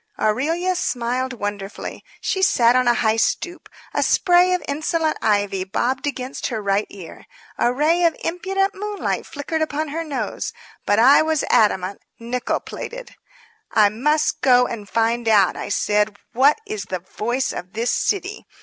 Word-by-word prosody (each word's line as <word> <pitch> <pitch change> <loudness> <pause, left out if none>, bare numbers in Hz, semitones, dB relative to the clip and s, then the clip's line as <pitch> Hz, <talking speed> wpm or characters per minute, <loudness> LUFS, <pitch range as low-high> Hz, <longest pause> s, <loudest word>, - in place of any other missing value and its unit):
Aurelia 320 +12 +1
smiled 255 -4 -1
wonderfully. 205 -3 -6 0.2
She 380 - -1
sat 245 -11 +4
on 255 0 +3
the 240 - +5
high 220 -1 +1
stoop. 350 +9 -1 0.2
A - - +1
spray 360 0 +4
of 360 - -4
insolent 310 +2 0
ivy 205 -3 +1
bobbed 245 +9 -1
against 265 -2 -4
her 230 -4 -3
right 200 0 0
ear. 185 -5 -11 0.3
A 240 - +3
ray 310 +7 +2
of 330 - +3
impudent 385 +3 -1
moonlight 415 +1 -3
flickered 315 +1 -4
upon 310 0 -1
her 325 +3 -3
nose. 290 -5 -4 0.3
But 205 - +3
I 255 +5 +7
was 315 -1 0
adamant, 200 -4 +2 0.2
nickel 240 +1 -2
plated. - - -8 0.6
"I 210 -2 +5
must 300 +7 0
go 250 -1 +5
and 210 -5 -6
find 230 +2 0
out," 205 -4 +4
I - - -5
said, 210 0 +1 0.2
"what 270 +5 +4
is 420 0 -5
the 185 - -3 0.2
Voice 240 +4 -1
of 180 +3 -7
this 230 +2 0
City. 400 +1 -2
255 Hz, 160 wpm, -21 LUFS, 215-320 Hz, 0.6 s, I